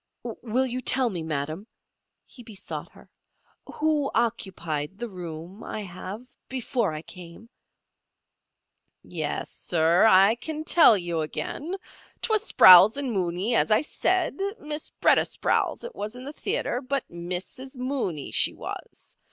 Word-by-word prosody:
"Will 245 Hz, +2 st, -2 dB
you 255 Hz, 0 st, -4 dB
tell 255 Hz, -1 st, +1 dB
me, 175 Hz, -3 st, -4 dB
madam," 155 Hz, +5 st, -4 dB, 0.6 s
he 250 Hz, -, -13 dB
besought 220 Hz, -4 st, -7 dB
her, -, -, -17 dB, 0.6 s
"who 300 Hz, -2 st, 0 dB
occupied 185 Hz, -8 st, -2 dB
the 240 Hz, +2 st, -4 dB
room 180 Hz, 0 st, -8 dB
I 215 Hz, -, -5 dB
have 190 Hz, +4 st, -8 dB, 0.2 s
before 250 Hz, -, -1 dB
I 155 Hz, 0 st, -6 dB
came?" 180 Hz, +6 st, -12 dB, 1.5 s
"Yes, -, -, -3 dB
sir. 170 Hz, +4 st, +3 dB
I 195 Hz, +2 st, +6 dB
can 305 Hz, +6 st, -5 dB
tell 315 Hz, -9 st, +6 dB
you 170 Hz, -3 st, -2 dB
again. 295 Hz, -, -4 dB, 0.4 s
'Twas 435 Hz, -3 st, +1 dB
Sprowls 185 Hz, +6 st, +9 dB
and 275 Hz, -3 st, -1 dB
Mooney, 185 Hz, +2 st, -1 dB
as -, -, +3 dB
I 215 Hz, +2 st, +4 dB
said. 355 Hz, +2 st, 0 dB, 0.2 s
Miss 300 Hz, 0 st, -5 dB
B'retta -, -, +3 dB
Sprowls -, -, -1 dB
it 480 Hz, 0 st, -7 dB
was 210 Hz, +3 st, -6 dB
in 250 Hz, -, -9 dB
the 285 Hz, +3 st, -7 dB
theatres, 395 Hz, -, -2 dB
but 275 Hz, -2 st, -1 dB
Missis 180 Hz, +10 st, -5 dB
Mooney 250 Hz, -, -3 dB
she -, -, +2 dB
was. -, -, -8 dB
220 Hz, 135 wpm, -26 LUFS, 175-265 Hz, 1.5 s, Sprowls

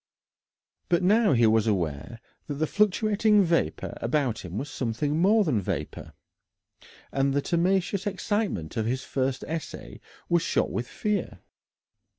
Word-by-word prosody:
But 175 Hz, 0 st, +2 dB
now 210 Hz, -1 st, +4 dB
he 120 Hz, -2 st, +4 dB
was 110 Hz, 0 st, +3 dB
aware 90 Hz, +1 st, -2 dB, 0.3 s
that 145 Hz, -, -3 dB
the 155 Hz, +3 st, 0 dB
fluctuating 210 Hz, +2 st, +3 dB
vapour 170 Hz, -2 st, 0 dB
about 125 Hz, -1 st, -1 dB
him 90 Hz, +1 st, -6 dB
was 140 Hz, -, -3 dB
something 135 Hz, +4 st, -2 dB
more 210 Hz, +5 st, +4 dB
than 135 Hz, -, 0 dB
vapour, 80 Hz, -4 st, -5 dB, 1.0 s
and 135 Hz, 0 st, +1 dB
the -, -, +3 dB
temerarious 190 Hz, +3 st, 0 dB
excitement 195 Hz, -, -2 dB
of 110 Hz, -1 st, 0 dB
his 130 Hz, +2 st, -2 dB
first 130 Hz, -1 st, -2 dB
essay 155 Hz, -, -6 dB, 0.3 s
was 170 Hz, -1 st, +2 dB
shot -, -, 0 dB
with 120 Hz, 0 st, -3 dB
fear. 210 Hz, -1 st, -3 dB
145 Hz, 140 wpm, -26 LUFS, 115-195 Hz, 1.0 s, now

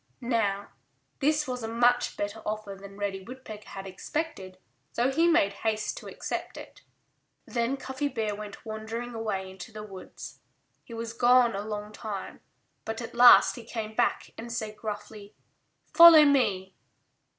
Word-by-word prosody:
Now, 200 Hz, -3 st, 0 dB, 0.5 s
this 300 Hz, +1 st, +1 dB
was 250 Hz, -1 st, -4 dB
a 225 Hz, -, -4 dB
much 240 Hz, +2 st, +2 dB
better 205 Hz, +2 st, -4 dB
offer 210 Hz, -1 st, -4 dB
than 195 Hz, 0 st, -12 dB
Reddy 200 Hz, -1 st, -3 dB
Woodpecker 220 Hz, -1 st, -10 dB
had 195 Hz, 0 st, -8 dB
expected, 190 Hz, -, -5 dB, 0.3 s
so 245 Hz, +3 st, +1 dB
he 325 Hz, +5 st, +3 dB
made 200 Hz, -13 st, +3 dB
haste 215 Hz, -1 st, -1 dB
to -, -, -9 dB
accept -, -, -5 dB
it. -, -, -11 dB, 0.6 s
Then 240 Hz, +3 st, -1 dB
Cuffy 265 Hz, +2 st, -3 dB
Bear 225 Hz, -6 st, -2 dB
went 205 Hz, +1 st, -9 dB
wandering 225 Hz, +2 st, -5 dB
away 210 Hz, -4 st, -3 dB
into 190 Hz, +2 st, -10 dB
the 215 Hz, -1 st, -8 dB
woods. 195 Hz, -3 st, -10 dB, 0.4 s
He 230 Hz, -, -10 dB
was 230 Hz, 0 st, -5 dB
gone 240 Hz, -1 st, +4 dB
a 200 Hz, -, -3 dB
long 210 Hz, 0 st, -5 dB
time. 210 Hz, -2 st, -7 dB, 0.4 s
But 225 Hz, 0 st, -5 dB
at 230 Hz, -, -7 dB
last 245 Hz, +1 st, +7 dB
he 240 Hz, -, -8 dB
came 220 Hz, -1 st, -5 dB
back -, -, 0 dB
and 235 Hz, +1 st, -7 dB
said 215 Hz, -2 st, -4 dB
gruffly, 210 Hz, -1 st, -7 dB, 0.6 s
"Follow 335 Hz, -3 st, +10 dB
me!" 200 Hz, -10 st, +2 dB
220 Hz, 155 wpm, -28 LUFS, 205-245 Hz, 0.6 s, Follow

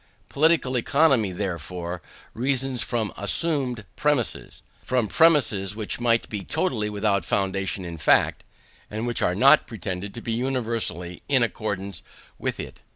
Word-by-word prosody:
Political 150 Hz, -4 st, +2 dB
Economy, 130 Hz, -5 st, +3 dB
therefore, 90 Hz, -1 st, -4 dB, 0.3 s
reasons 130 Hz, +1 st, 0 dB
from 115 Hz, -4 st, -2 dB
assumed 125 Hz, -, +1 dB
premises 145 Hz, -5 st, -1 dB, 0.2 s
from 125 Hz, -4 st, 0 dB
premises 110 Hz, -, +3 dB
which 110 Hz, 0 st, -4 dB
might 115 Hz, -1 st, +2 dB
be 105 Hz, -3 st, -5 dB
totally 125 Hz, -, -1 dB
without 100 Hz, -2 st, 0 dB
foundation 95 Hz, +1 st, -1 dB
in 85 Hz, -2 st, -7 dB
fact, -, -, +3 dB, 0.5 s
and 110 Hz, +2 st, -4 dB
which 120 Hz, -2 st, -1 dB
are 90 Hz, -, +1 dB
not 135 Hz, +9 st, +6 dB
pretended 100 Hz, -1 st, -5 dB
to -, -, -5 dB
be 115 Hz, -, -4 dB
universally 115 Hz, -8 st, -2 dB
in 130 Hz, -4 st, +4 dB
accordance 100 Hz, -5 st, -3 dB, 0.4 s
with -, -, -3 dB
it. -, -, -7 dB
110 Hz, 135 wpm, -24 LUFS, 95-130 Hz, 0.5 s, not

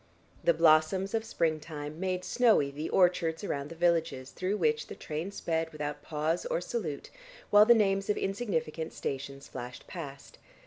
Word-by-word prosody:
The 170 Hz, -, +4 dB
blossoms 165 Hz, +5 st, +4 dB
of 225 Hz, -1 st, +1 dB
springtime 155 Hz, -6 st, -2 dB
made 185 Hz, -1 st, -1 dB
snowy 225 Hz, -, +3 dB
the 150 Hz, +3 st, -4 dB
orchards 175 Hz, -2 st, +2 dB
around 140 Hz, -7 st, -3 dB
the 165 Hz, -, -8 dB
villages 165 Hz, -6 st, +1 dB
through 190 Hz, +3 st, -2 dB
which 455 Hz, -, +1 dB
the -, -, -8 dB
train 160 Hz, +5 st, -4 dB
sped 165 Hz, -4 st, -2 dB
without 150 Hz, -1 st, -4 dB
pause 155 Hz, +3 st, -1 dB
or -, -, 0 dB
salute, 175 Hz, -6 st, -4 dB, 0.4 s
while 210 Hz, +1 st, +8 dB
the 240 Hz, -, +8 dB
names 195 Hz, -2 st, +2 dB
of 210 Hz, -, +2 dB
insignificant 165 Hz, -7 st, -2 dB
stations 140 Hz, 0 st, -5 dB
flashed 125 Hz, +1 st, -8 dB
past. 140 Hz, -6 st, -9 dB
165 Hz, 160 wpm, -30 LUFS, 150-195 Hz, 0.4 s, while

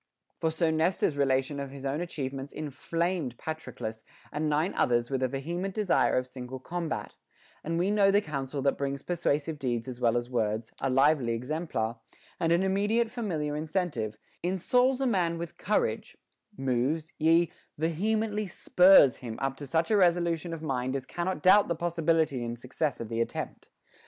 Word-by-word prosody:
For 160 Hz, -, +1 dB
so 160 Hz, 0 st, +1 dB
Nestor's 160 Hz, -1 st, +1 dB
relation 135 Hz, 0 st, +1 dB
of 140 Hz, -1 st, -4 dB
his 140 Hz, 0 st, -9 dB
own 140 Hz, +4 st, -1 dB
achievements 135 Hz, -5 st, -4 dB
inflamed 155 Hz, -1 st, -2 dB
Patroclus 115 Hz, -8 st, -6 dB, 0.3 s
and 150 Hz, +1 st, -1 dB
nine 155 Hz, +5 st, +1 dB
others 120 Hz, +1 st, +1 dB
with 135 Hz, -1 st, 0 dB
a 130 Hz, -, +3 dB
vehement 170 Hz, +9 st, -4 dB
desire 210 Hz, -10 st, +2 dB
of 130 Hz, -, +1 dB
single 125 Hz, 0 st, -7 dB
combat; 170 Hz, +5 st, -4 dB, 0.5 s
and 165 Hz, +2 st, -2 dB
we 185 Hz, +4 st, +1 dB
know 205 Hz, -2 st, +4 dB
the 200 Hz, +1 st, +5 dB
counsel 140 Hz, -5 st, -4 dB
that 140 Hz, -, +1 dB
brings 140 Hz, 0 st, -2 dB
persuasive 160 Hz, -3 st, -1 dB
deeds 120 Hz, -3 st, -2 dB
as 125 Hz, -1 st, -7 dB
well 120 Hz, 0 st, +3 dB
as 120 Hz, 0 st, -2 dB
words, 110 Hz, -2 st, -1 dB
a 135 Hz, -, +1 dB
lively 135 Hz, -2 st, +3 dB
exemplar, 125 Hz, -3 st, -2 dB, 0.4 s
and 165 Hz, -1 st, +1 dB
an 170 Hz, +2 st, +3 dB
imme 195 Hz, +2 st, +1 dB
diate 230 Hz, 0 st, +2 dB
familiar 165 Hz, -12 st, -2 dB
incentive, 150 Hz, -, -2 dB, 0.2 s
insouls 250 Hz, +9 st, +2 dB
a -, -, +2 dB
man 180 Hz, -8 st, +1 dB
with 170 Hz, -1 st, -6 dB
courage, -, -, -1 dB, 0.4 s
moves, 135 Hz, +5 st, -1 dB
yea, 165 Hz, +2 st, +4 dB, 0.3 s
vehemently 210 Hz, +6 st, 0 dB
spurs 180 Hz, -6 st, +6 dB
him 115 Hz, -3 st, -7 dB
up 135 Hz, 0 st, -2 dB
to 145 Hz, -, -7 dB
such 160 Hz, -, +1 dB
a 215 Hz, -, +5 dB
resolution 170 Hz, -2 st, +2 dB
of 165 Hz, -1 st, -6 dB
mind 130 Hz, -3 st, -1 dB
as 135 Hz, -2 st, -3 dB
cannot 175 Hz, +1 st, -3 dB
doubt 200 Hz, +3 st, +7 dB
the 170 Hz, -, 0 dB
possibility 165 Hz, -5 st, +1 dB
and 120 Hz, 0 st, -4 dB
success 135 Hz, +4 st, -2 dB
of 115 Hz, -, -5 dB
the 115 Hz, +1 st, -1 dB
attempt. 115 Hz, -, -4 dB
155 Hz, 170 wpm, -29 LUFS, 130-175 Hz, 0.5 s, doubt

